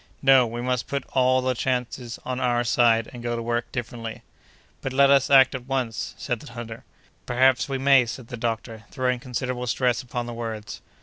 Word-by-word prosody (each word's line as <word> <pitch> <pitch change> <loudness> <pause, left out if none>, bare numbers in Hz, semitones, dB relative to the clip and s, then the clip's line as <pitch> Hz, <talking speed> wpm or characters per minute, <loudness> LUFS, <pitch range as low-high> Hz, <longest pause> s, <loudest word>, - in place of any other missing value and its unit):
No! 135 -2 +6
we 120 +1 -5
must 125 -2 -1
put 140 -2 -2
all 130 0 +3
the 130 0 +1
chances 125 -1 -3
on 130 0 -3
our 120 -1 +1
side, 115 -1 +3
and 120 - -8
go 120 0 -2
to 115 - -3
work 120 0 -2
differently." 115 -2 -6 0.6
"But 135 - -4
let 140 +1 +5
us 140 -2 +4
act 135 -1 +6
at 130 -1 -6
once!" 130 -4 -2
said 120 -2 -3
the 115 - -12
hunter. 115 -1 -8 0.4
"Perhaps 130 +2 +3
we 135 - -1
may," 135 -2 +5
said 115 0 -7
the 125 - -5
doctor, 115 -1 -4
throwing 125 -2 -1
considerable 125 0 -4
stress 125 0 +1
upon 120 -1 -4
the 120 - -6
words. 110 -3 -6
125 Hz, 195 wpm, -24 LUFS, 115-130 Hz, 0.6 s, No